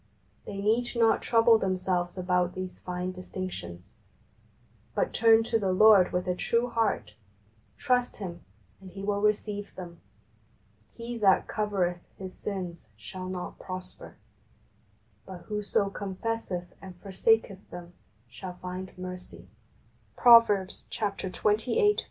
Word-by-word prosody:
They 200 - -6
need 225 +5 +1
not 230 -1 +3
trouble 230 -1 +5
them 185 -2 0
selves 180 -1 -1
about 180 -1 0
these 185 -1 -6
fine 180 0 -4
distinctions, 180 - -7 1.0
but - - 0
turn 225 0 +5
to 225 0 0
the 195 -3 0
Lord 200 -1 +6
with 180 0 -1
a 180 - +2
true 235 +6 0
heart, 225 -2 0 0.6
trust 250 -2 +1
Him, 175 -4 -6 0.4
and 190 - -12
He 195 +2 -9
will 200 0 0
receive 210 -1 -1
them. 170 -2 -9 0.5
" 105 -1 -36
He 235 0 -5
that 195 -3 +4
covereth 190 -5 -1 0.2
his 190 -1 -7
sins 180 - -6
shall 185 - -7
not 180 -1 -6
prosper; 185 0 -8 1.1
but 185 -2 -8
whoso 210 -1 -1
confesseth 195 -2 -4
and 190 -2 -10
forsaketh 195 +1 0
them 175 0 -9 0.3
shall 180 +9 -8
find 185 +1 -7
mercy" 180 - -9 0.7
{Prov. 235 -1 +8
xxviii. 200 0 -2
13). 245 - +2
190 Hz, 130 wpm, -28 LUFS, 180-215 Hz, 1.1 s, Prov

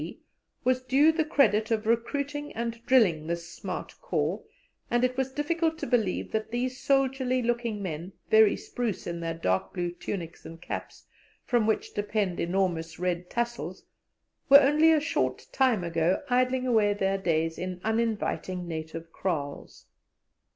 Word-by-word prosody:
G., - - -7 0.4
was 255 0 +2
due 270 +5 +4
the 320 0 +1
credit 265 -8 +3
of 220 -1 0
recruiting 280 +6 -1
and 235 0 -4
drilling 190 -12 +4
this 170 0 -3
smart 175 - -6
corps, - - -1 0.5
and 240 +1 +2
it 255 0 +1
was 265 0 -1
difficult 320 +3 0
to - - -4
believe 225 -6 0
that 220 0 -2
these 250 +2 -2
soldierly 265 -2 +1
looking 235 -3 -1
men, 175 +1 -5 0.2
very 220 -1 +6
spruce 225 -7 -4
in 170 -1 -4
their 165 0 -3
dark 95 - -1
blue 175 -1 -1
tunics 175 -1 -6
and 165 0 -10
caps, - - -7 0.4
from 235 -3 +2
which 220 - 0
depend 205 -3 -1
enormous 170 -3 -1
red 180 0 -2
tassels, 235 -7 -3 0.6
were 280 +1 +11
only 300 +4 +5
a 315 - +5
short 325 +2 -1
time 255 -8 +2
ago 170 +1 +1
idling 255 +1 +2
away 215 -4 +3
their 195 -1 0
days 165 -2 0
in 180 0 -4
uninviting 220 -5 -1
native 165 0 -6
kraals. 150 -7 -4
220 Hz, 150 wpm, -28 LUFS, 175-255 Hz, 0.6 s, were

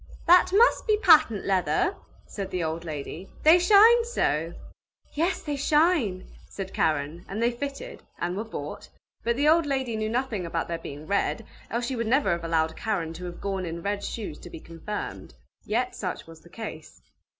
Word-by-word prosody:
"That 355 +1 +6
must 460 +6 +4
be 425 -1 +4
patent 320 - +5
leather!" 185 - +1 0.3
said 195 -2 -6
the 180 -2 -2
old 160 +1 -3
lady. 155 +4 -6
"They 320 +3 +7
shine 435 +6 +7
so!" 165 - -1 0.6
"Yes, 335 +5 0
they 295 -2 -2
shine!" 285 - +2 0.2
said 190 -1 -7
Karen, 155 +2 -1
and 200 - -4
they 235 +1 +2
fitted, 275 +3 -6 0.2
and 175 +1 -2
were 210 - -2
bought, 220 - -7 0.3
but 235 0 +1
the 285 +4 +1
old 320 0 +4
lady 265 -4 -1
knew 215 0 -2
nothing 235 -4 -1
about 165 -1 -3
their 170 -1 -3
being 145 -1 -8
red, 200 +4 -1 0.2
else 235 +1 -2
she 260 - -3
would 230 -2 -2
never 255 -4 +2
have 170 0 -1
allowed 160 -1 0
Karen 185 -8 -2
to 180 +2 -8
have 175 -1 -7
gone 195 -1 -2
in 170 -1 -5
red 200 0 -2
shoes 205 -10 -5
to - - -11
be - - -9
confirmed. 165 +7 -7 0.3
Yet 250 +4 -1
such 180 -3 -4
was 165 -1 -13
the 170 - -18
case. 175 -7 -9
210 Hz, 185 wpm, -26 LUFS, 170-280 Hz, 0.6 s, They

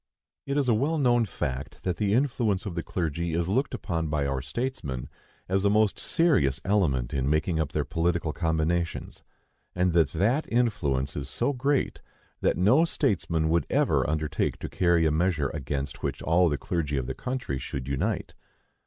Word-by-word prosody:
It 140 +1 0
is 140 -3 +1
a 120 - +4
well 145 +9 +1
known 120 -4 +3
fact 65 -5 -5
that 90 -2 -1
the 100 -2 0
influence 120 -7 +1
of 100 - -4
the 85 - -2
clergy 85 -1 -2
is 85 0 0
looked 130 +7 0
upon 85 -8 -2
by 75 -2 0
our 70 -1 -1
statesmen 70 - -4 0.4
as 95 +1 +1
a 100 - +4
most 105 0 +2
serious 105 - +2
element 75 -12 +1
in 70 0 0
making 75 +2 +1
up 75 -2 -1
their 75 -2 -1
political 85 -1 0
combinations; 85 +1 -1 0.5
and 90 -1 +2
that 80 -5 +3
that 120 +11 +1
influence 75 - 0
is 70 -1 -4
so 120 - 0
great, 135 +2 0 0.4
that - - +2
no 115 - +5
statesman 90 - 0
would 85 +1 +1
ever - - +2
undertake 80 0 -1
to - - -6
carry 85 -2 +2
a 80 - +3
measure 80 -3 +1
against 70 -1 -4
which - - -3
all 85 +2 +4
the 75 - 0
clergy 75 -4 -2
of 65 - -1
the - - -3
country 125 - -3
should 65 -1 -5
unite. 70 -1 -2
85 Hz, 180 wpm, -27 LUFS, 75-110 Hz, 0.5 s, no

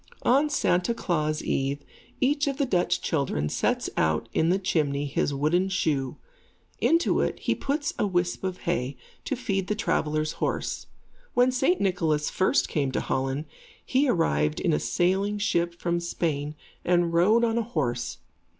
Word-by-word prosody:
On 280 +5 +4
Santa 205 -6 +1
Klaas 155 -7 -1
eve, 140 +1 -1 0.4
each 285 +2 +2
of 275 -1 -1
the 280 - +1
Dutch 180 -8 +1
children 130 - -1
sets - - 0
out 80 +8 +1
in 160 - +2
the 185 - +3
chimney 145 -7 0
his 145 0 0
wooden 155 +7 +1
shoe. 145 -8 -1 0.6
Into 335 +1 +3
it, - - -1
he - - 0
puts 290 +4 -2
a 210 - +2
whisp 175 -1 -1
of 185 -1 -3
hay, 135 -6 -2 0.3
to 275 - -1
feed 195 -6 -2
the 210 - 0
traveller's 155 -7 0
horse. - - -2 0.5
When 250 +1 +4
St. 265 +8 +2
Nicholas 165 -6 +1
first 190 - +2
came 140 -4 -1
to - - +1
Holland, 135 +3 -2 0.4
he 270 +2 +2
arrived 75 - +1
in - - +1
a 75 - +2
sailing 190 - +1
ship 170 -4 0
from 170 0 0
Spain 155 -4 -2 0.3
and 175 -1 +2
rode 210 +8 +4
on 230 0 +2
a - - +2
horse. 120 - -2
175 Hz, 160 wpm, -26 LUFS, 145-210 Hz, 0.6 s, On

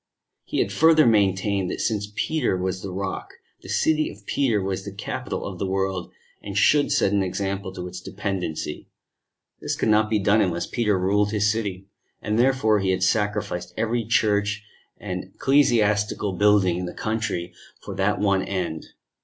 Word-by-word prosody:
He - - -4
had - - -1
further 160 -1 +5
maintained 100 -3 +2
that - - -4
since 105 -2 -1
Peter 155 -11 0
was 95 0 -2
the 95 - -5
Rock, 95 +1 -5 0.3
the - - -12
City 155 -1 +2
of 100 0 -13
Peter 120 -5 +1
was 95 0 -3
the 100 - -6
Capital 100 +2 -5
of 95 -3 -6
the 100 - -1
world, 95 -1 -2 0.3
and 100 -1 -5
should 145 +7 +4
set 100 - +2
an 100 - +3
example 95 +1 -3
to 90 -2 -6
its 90 0 -8
dependency: 95 -7 -4 0.7
this - - -2
could - - 0
not 110 0 +4
be 110 - +2
done 105 +2 +3
unless 85 -3 0
Peter 105 -5 0
ruled 100 +3 +2
his 105 0 +2
City, 100 -4 -3 0.3
and 105 +2 -1
therefore 120 -4 +3
he 95 -1 0
had 95 0 +1
sacrificed 95 -3 -1
every 115 +1 0
church 105 -2 +1 0.3
and 90 -3 -5
ecclesiastical 105 -7 +2
building 100 -2 +3
in 90 - -3
the - - -8
country 105 -6 -2 0.3
for - - -6
that 100 0 0
one 100 -2 +2
end. 90 -5 -3
100 Hz, 170 wpm, -24 LUFS, 95-110 Hz, 0.7 s, further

